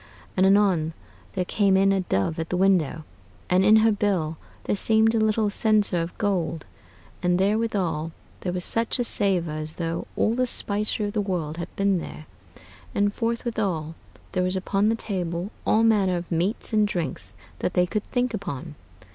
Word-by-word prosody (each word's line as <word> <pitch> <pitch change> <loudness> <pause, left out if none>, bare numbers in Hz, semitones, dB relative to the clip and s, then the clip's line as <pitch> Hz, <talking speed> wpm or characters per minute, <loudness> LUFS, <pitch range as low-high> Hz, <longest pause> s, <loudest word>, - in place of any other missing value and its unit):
And 190 0 +4
anon 190 -5 +3 0.4
there 185 -2 -1
came 195 0 +2
in 195 +1 +4
a 195 -1 +2
dove 160 - -1
at 160 - -3
the 180 - -1
window, 180 -5 +2 0.5
and 185 +1 +4
in 210 +2 +6
her 225 - +5
bill 190 -7 0 0.3
there - - 0
seemed 220 +2 +3
a 225 - +2
little 215 -1 +2
censer 210 -4 +2
of 165 +1 -6
gold, 170 -7 -1 0.6
and 180 -1 +2
therewithal 195 -6 0 0.3
there 180 - -3
was 180 0 -3
such 230 0 +1
a 245 - +1
savor 195 -8 +1
as 155 +1 -5
though 165 -1 -3
all 220 - +2
the 255 +1 +1
spicery 210 -1 -1
of 205 - -4
the 210 - +1
world 170 -6 -3
had 170 - -5
been 195 -2 +2
there; 155 - -8 0.7
and 205 0 +2
forthwithal 220 -9 -2 0.4
there 185 - 0
was 185 +1 0
upon 195 +2 +1
the 225 - +2
table 180 -3 -3 0.2
all 220 - +4
manner 200 -5 +3
of 175 +1 -7
meates 180 +8 -1
and 215 -1 +4
drinkes 130 - -4 0.2
that 180 - -2
they 180 - +4
could 210 +3 -2
thinke 245 -1 0
upon. 170 -11 -5
190 Hz, 180 wpm, -25 LUFS, 170-215 Hz, 0.7 s, in